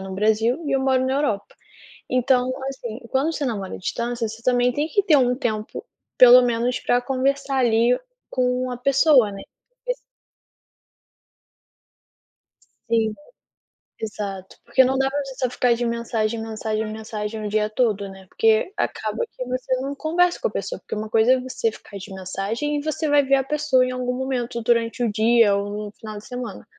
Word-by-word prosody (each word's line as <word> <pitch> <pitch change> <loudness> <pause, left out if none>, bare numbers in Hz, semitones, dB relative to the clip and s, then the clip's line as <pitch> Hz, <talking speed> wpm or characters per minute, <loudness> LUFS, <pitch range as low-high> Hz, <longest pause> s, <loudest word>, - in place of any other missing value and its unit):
mora 190 - -7
no - - -5
Brasil 220 - +2
e 280 - -1
eu 270 - +2
moro 260 -1 +2
na 260 - 0
Europa. 275 -9 -1 0.6
Então, 255 0 +2 0.2
assim, 240 -3 -7
quando 285 +5 +1
você 290 - -2
namora 200 -6 -3
à - - -8
distância, 235 +3 -2
você 225 +1 -10
também 245 0 +3
tem 295 +4 -1
que 405 - +2
ter 310 -6 +5
um 250 -1 +3
tempo, 220 - -3 0.3
pelo 250 0 +9
menos, 240 +1 0
para 245 0 +1
conversar, 270 +1 0
ali, 235 0 +3 0.3
com 250 0 0
a 245 - -4
pessoa, 270 -3 +4
né. 195 - -8 0.5
E - - +2
assim - - -4 2.9
Sim. 220 -2 +2 0.9
Exato, 200 -3 -5
porque 260 - +4
não 265 +1 +1
dá 270 0 +1
para 285 0 -2
você 270 -1 -8
só 255 -2 0
ficar 245 -1 +2
de 240 +1 -2
mensagem, 230 -1 -1
mensagem, 220 0 -3
mensagem, 215 0 -5
o - - -2
dia 210 0 +1
todo, 215 -3 0
né, 190 0 -13
porque 225 - +2
acaba 485 - -2
que 255 - -7
você 255 +1 -2
não 275 +1 -3
conversa 345 +4 +1
com - - 0
a - - 0
pessoa, - - -4
porque - - -7
uma 215 0 -5
coisa 225 +2 +4
é 260 - +3
você 250 -3 -2
ficar 200 -2 -11
de 195 0 -9
mensagem 195 +10 -3
e - - -4
você 310 0 -1
vai 290 -1 +4
ver 275 +1 +3
a 270 - +3
pessoa 275 -2 +2
em 255 - -2
algum 250 0 -2
momento, 245 -3 -3
durante 230 +1 +1
o 230 - +1
dia, 225 -1 +4
ou 205 +1 -3
no 205 - -9
final 215 -1 -8
de 205 - -9
semana. 245 -5 -6
245 Hz, 190 wpm, -23 LUFS, 220-265 Hz, 2.9 s, pelo